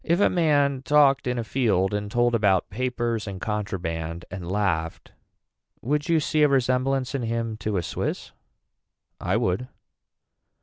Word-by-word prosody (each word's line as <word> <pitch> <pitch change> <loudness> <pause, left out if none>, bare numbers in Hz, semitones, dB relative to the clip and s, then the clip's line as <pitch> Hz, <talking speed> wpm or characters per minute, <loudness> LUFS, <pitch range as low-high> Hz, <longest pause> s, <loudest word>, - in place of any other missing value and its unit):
If 170 +2 +1
a - - +4
man 145 -6 +2
talked 140 -2 +4
in 125 0 -1
a 120 - -1
field 105 -6 +1
and 105 0 -2
told 120 +2 +2
about 100 -5 +2
papers 120 -1 -2
and 95 -2 -6
contraband 85 -5 -4
and 90 -1 -6
laughed 90 -5 -1 0.7
would 145 +5 -1
you 165 -1 +4
see 155 +1 0
a 150 - +7
resemblance 130 0 +1
in 135 - -1
him 115 -1 -2
to 105 -1 -2
a 90 - -1
Swiss. - - -4 0.9
I - - 0
would. 95 +8 -1
115 Hz, 150 wpm, -25 LUFS, 95-135 Hz, 0.9 s, a